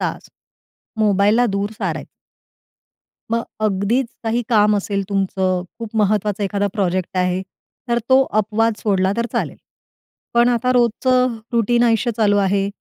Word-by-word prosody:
तास - - -4 0.7
मोबाईलला 210 +3 +3
दूर 200 -1 -2
सारायचं. - - -3 1.2
मग 230 0 +1 0.2
अगदीच 215 +5 +1 0.2
काही 230 +2 0
काम 210 -3 +4
असेल 200 0 -2
तुमचं, 190 -2 0 0.2
खूप 230 -1 -7
महत्त्वाचा 210 -1 +1
एखादा 200 +1 -1
प्रोजेक्ट 185 -3 -1
आहे, 180 0 +1 0.5
तर 235 0 +2
तो 260 0 +6 0.2
अपवाद 220 +2 0
सोडला 190 -2 +1
तर 235 0 0
चालेल. - - -2 0.8
पण 235 +1 +5
आता 245 +1 +1
रोजचं 250 +1 +2 0.2
रूटीन 235 +1 +2
आयुष्य 230 0 +2
चालू 210 -3 +3
आहे. 195 0 +1
210 Hz, 130 wpm, -19 LUFS, 195-235 Hz, 1.2 s, तो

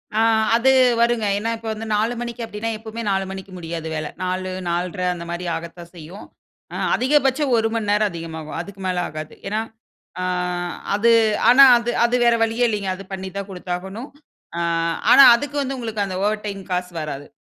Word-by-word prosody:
ஆ. - - +2 0.4
அது 260 +3 +4 0.3
வருங்க. 235 -2 +2
ஏன்னா 225 +2 -2
இப்போ 225 0 -10
வந்து 220 +1 -7
4:00 220 +3 +1
மணிக்கு 235 0 -5
அப்டின்னா, 225 +1 -4
எப்போமே 225 +1 -7
4:00 195 0 +1
மணிக்கு 195 0 -8
முடியாது 165 -1 -6
வேல. 155 -1 -3 0.2
4:00 185 0 -2 0.2
4:30 180 +2 -2
அந்த 170 -1 -8
மாரி 175 +1 -4
ஆகத்தான் 170 +1 -9
செய்யும். 170 +5 -10 0.5
அ - - -4 0.2
அதிகபட்சம் 270 0 +2
1 225 0 +2
மணி 220 -3 -2
நேரம் 210 0 +2
அதிகமாகும். 160 -2 -7
அதுக்கு 195 +1 -11
மேல 185 - -1
ஆகாது. 155 0 -7
ஏன்னா, 215 +2 -1 0.6
ஆ - - -2 0.7
அது 230 +3 +3 0.4
ஆனா 265 +3 +8
அது 235 0 -3 0.2
அது 240 +1 +1
வேற 235 -1 +5
வழியே 225 +2 +1
இல்லைங்க 205 -3 -2
அது 195 - -10
பண்ணி 190 0 -5
தான் 200 0 -5
குடுத்தாகணும். 190 +6 -6 0.5
ஆ - - -1 0.5
ஆனா 275 - +9
அதுக்கு 290 +4 -5
வந்து 270 0 -3
உங்களுக்கு 220 -4 -3
அந்த 185 -1 -5
ஓவர் 210 0 -1
டைம் 195 -1 -6
காசு 180 0 -3
வராது. 145 -2 -6
205 Hz, 180 wpm, -21 LUFS, 180-230 Hz, 0.7 s, ஆனா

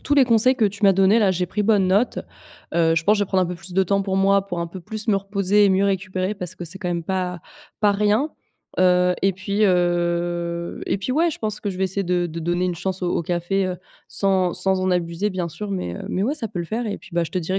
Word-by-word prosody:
tous 290 - 0
les 275 -2 +6
conseils 240 +2 +4
que 230 - +1
tu 205 +1 -2
m'as 195 - +7
donnés 195 +4 +4
là. 200 -4 +3
J'ai 180 0 -1
pris 210 +4 -2
bonne 200 -3 +3
note. 205 +7 +2 0.6
Heu, 165 -1 +3
je 165 - +1
pense 210 0 +4
je 205 - +2
vais - - -12
prendre 185 -1 +2
un - - 0
peu 180 - -4
plus 180 +1 -11
de 190 +1 +3
temps 200 +2 +1
pour 190 -1 -2
moi, 195 0 +3
pour 175 -3 -4
un 170 - -2
peu 185 +2 -9
plus 215 +5 -3
me 200 - +4
reposer 200 +1 +2
et 200 - +5
mieux 190 +1 +3
récupérer, 190 0 -1
parce 180 -2 -7
que 180 - -7
c'est 170 +3 -7
quand 180 - -3
même 170 -1 -2
pas, 180 0 -2 0.4
pas 210 - +4
rien. 210 +9 +1 0.5
Heu, 180 0 +4
et 195 0 +3
puis 200 +3 -1
heu, 175 -2 0
et - - 0
puis 200 - -4
ouais, 330 +5 +2
je - - -7
pense 215 -1 -3
que 205 - -4
je 185 - -7
vais 190 - +1
essayer 190 +2 -1
de 175 0 0
de 165 0 -7
donner 175 +2 0
une 180 - -1
chance 185 +2 -4
au 175 - 0
au - - 0
café, 175 +3 -1
heu, 180 - -3 0.3
sans 190 -3 +1
sans 190 -1 0
en 185 - 0
abuser 175 +3 -1
bien 180 -2 -3
sûr. 200 +6 -6
Mais, 90 - -3
heu, - - -7
mais 190 - -1
ouais, 270 +7 0
ça 235 -7 -3
peut 190 -3 -6
le - - -3
faire, 230 +4 -3
et 205 - -3
puis, 190 - -16
beh, 170 0 +1
je - - -8
te 185 - 0
dirai 185 +3 -1
190 Hz, 285 wpm, -22 LUFS, 175-205 Hz, 0.6 s, m'as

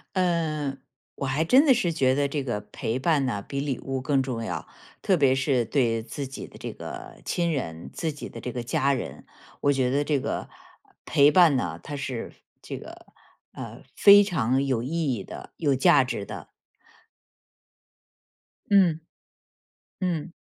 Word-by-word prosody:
呃， 155 -6 0 0.4
我 140 - -4
还 140 +5 +1
真 260 - +5
的 270 - +7
是 215 -8 +1
觉 130 -4 +2
得 140 0 +1
这 140 -1 -2
个 120 -5 -2
陪 115 +3 -2
伴 145 -1 +2
呢， 105 -5 -2
比 140 - -3
礼 140 -3 -2
物 135 -1 -3
更 135 0 +2
重 120 -3 -3
要。 - - -4 0.3
特 190 - +3
别 135 -4 +4
是 135 -2 +1
对 115 -2 +1
自 130 +4 -5
己 135 - -8
的 - - -15
这 - - -6
个 - - -9
亲 170 -1 0
人、 80 - -4
自 160 -2 -2
己 145 - -8
的 - - -9
这 125 - -4
个 120 0 -4
家 140 +3 +1
人， 130 - -5 0.4
我 145 - +3
觉 130 -2 +1
得 140 +3 +1
这 145 -1 +1
个 - - -4 0.6
陪 145 -1 +5
伴 165 -3 +6
呢， 85 -10 -2
它 145 - -6
是 130 -4 -5 0.3
这 - - -6
个， - - -11 0.5
呃， - - -8
非 205 0 +8
常 135 - +1
有 130 -4 0
意 155 0 -1
义 100 -5 -4
的、 - - -10
有 145 -4 +2
价 135 +1 +5
值 125 -6 -4
的。 - - -8 2.2
嗯。 180 -6 +5 1.0
嗯。 175 -2 -2
140 Hz, 180 characters per minute, -26 LUFS, 130-160 Hz, 2.2 s, 非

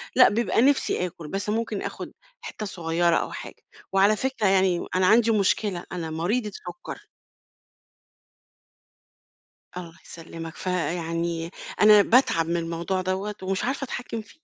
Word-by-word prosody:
لأ، 250 - +8
بيبقى 225 +1 +1
نفسي 265 -8 +2
آكُل 170 -3 -8
بس 195 +5 -3
ممكن 220 -2 -1
آخد - - -6 0.3
حتّه 215 - -6
صغيرة 170 -2 0
أو - - -1
حاجة. - - -9 0.3
وعلى 195 +2 +4
فكرة، 260 -4 -1
يعني 190 -2 +2
أنا 185 0 +3
عندي 225 +2 +5
مشكلة 200 -3 +1
أنا 170 -3 -4
مريضة 205 +8 -1
سكر. 350 - -9 2.7
الله 170 -2 -8
يسلمك. 165 0 -9
فيعني 170 -2 -2 0.3
أنا 210 -1 +8
باتعب 210 -9 +3
من 170 +1 0
الموضوع 170 +3 -2
دوّة 190 +3 -2
ومش 190 +1 -1
عارفة 270 +2 -2
اتحكِم 245 -3 -5
فيه. 225 - -20
190 Hz, 135 wpm, -25 LUFS, 170-215 Hz, 2.7 s, لأ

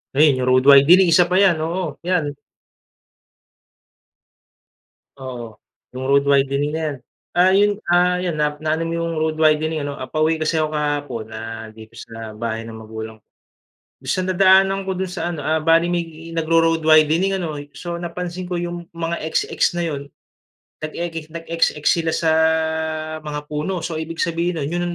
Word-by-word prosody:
Ayan 145 -3 +4
yung 125 - -1
road 130 0 +4
widening, 170 +6 +7
isa 175 +2 +5
pa 180 - -1
yan, 190 -5 +4
oo 165 -1 -3
yan. 175 -6 +1 2.9
Oo, 120 -4 -8 0.4
yung 130 - -4
road 140 +1 +3
widening 140 +1 +2
na - - -3
yan, - - -7 0.4
ah, 180 +1 +5
yun 205 +1 +4 0.2
,ah, 180 +1 +4
yan 175 -4 -2
na, 150 0 +1
na-ano 155 +1 -1
mo 165 - -3
yung 165 0 -2
road 155 0 0
widening 155 0 +2
ano? 145 0 -5 0.2
Pauwi 155 +1 +2
kasi 155 0 0
ako 155 0 -2
kahapon, 145 -6 -2
ah, 110 0 -7
dito 110 +1 -14
sa 115 -2 -9
bahay 115 0 -3
ng 110 - -9
magulang 110 0 -8
ko, 105 - -37 0.8
minsan 185 - -1
nadaanan 190 +1 +3
ko 190 - -1
do'n 185 0 -3
sa 175 - -3
ano, 160 -5 -5
ah, 155 0 +1
bale 165 +1 +4
may 165 -1 -5
nag-ro-road 165 0 +2
widening 160 +5 +4
ano 160 -6 -4 0.2
so 175 - -6
napansin 180 +1 -5
ko 180 - -2
yung 175 0 -5
mga 170 0 -3
XX 160 0 -2 0.2
na 175 - 0
'yon, 145 -4 -3 0.8
nag-eki 165 0 -5
nag-XX 165 -1 -2
sila 165 0 +2
sa 160 -1 +1 0.9
mga 150 -1 -6
puno, 160 +4 -3
so 160 -2 -3
ibig 165 +1 -3
sabihin 170 -2 -1
nun 145 - -4
'yon 175 0 -1
160 Hz, 165 wpm, -20 LUFS, 145-175 Hz, 2.9 s, widening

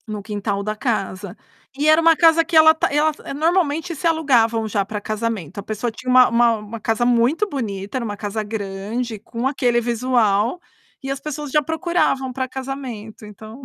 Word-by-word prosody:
No 210 -1 -5
quintal 205 -1 -3
da 215 +1 -3
casa. 205 -5 -3 0.4
E 295 +2 +1
era 310 +1 +6
uma 330 0 +5
casa 330 0 +5
que 330 +1 -5
ela 315 0 +8
tá 320 - -1
ela 300 +2 +2 0.2
normalmente 325 +1 0
se 310 - -7
alugavam 235 -9 +2
já 205 -1 0
para 210 +2 -5
casamento, 215 -5 -4
a - - -6
pessoa 215 +3 -3
tinha 255 +3 -7
uma 255 0 +7
uma 235 0 +3
uma 210 +2 -8
casa 225 +2 0
muito 245 - +2
bonita, 210 - -4
era 250 - -3
uma 205 -2 -5
casa 210 +1 -3
grande, 210 +2 -4
com 230 +4 -3
aquele 250 -3 +1
visual, 235 - +1 0.4
e 270 - -6
as 275 0 -3
pessoas 300 -1 -6
já 300 - +3
procuravam 320 -4 -1
para 260 0 -2
casamento, 255 -5 -7
então. 215 +4 -12
240 Hz, 185 wpm, -21 LUFS, 215-285 Hz, 0.4 s, ela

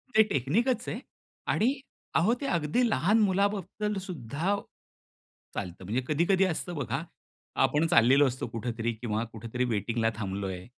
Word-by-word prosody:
ते 220 - +8
टेक्निकच 225 - +1
आहे 225 - -3 0.5
आणि 240 +5 +3 0.4
अहो 200 +8 +4
ते - - -2
अगदी 170 - +1
लहान 215 +1 +3
मुलाबद्दल 200 +1 0
सुद्धा 165 - -2 1.0
चालतं, 90 -1 -5
म्हणजे 115 +7 0
कधी-कधी 175 +5 +3
असतं 175 0 -2
बघा 140 0 -2 0.6
आपण 155 +3 +1
चाललेलो 135 -2 +6
असतो 130 0 -3
कुठेतरी 115 0 -3
किंवा 110 -1 -2
कुठेतरी 115 +3 -3
वेटिंगला 115 0 0
थांबलोय, 95 -3 -4
145 Hz, 130 wpm, -29 LUFS, -, 1.0 s, ते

